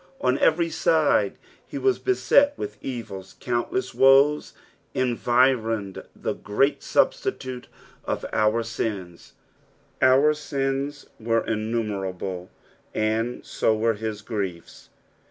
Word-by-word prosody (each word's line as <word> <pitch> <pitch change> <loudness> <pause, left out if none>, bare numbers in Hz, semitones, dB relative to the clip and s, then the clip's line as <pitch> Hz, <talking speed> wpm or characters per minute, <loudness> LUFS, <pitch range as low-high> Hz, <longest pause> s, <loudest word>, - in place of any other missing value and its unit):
On 130 +1 +1
every 165 +1 +3
side - - +2 0.3
he - - -6
was 395 -1 +1
beset 290 -6 +3
with 415 - -6
enia; 110 -7 -7
cuunttcss 125 - -2
woes 135 +3 +4 0.4
environed 120 -4 +1
the - - -3
great 135 +8 0
Substitute 395 - -1 0.4
for - - -3
our 110 +2 +2
sios. 100 -6 -5 0.7
Our 130 +3 +6
BIDS 140 -1 -3
were 115 0 0
innumerable, 100 -5 -3 0.5
and 110 +3 -1
so 110 - +1
were 115 +1 +2
his 110 0 -5
griefs. 95 -7 -5
120 Hz, 100 wpm, -24 LUFS, 110-135 Hz, 0.7 s, Our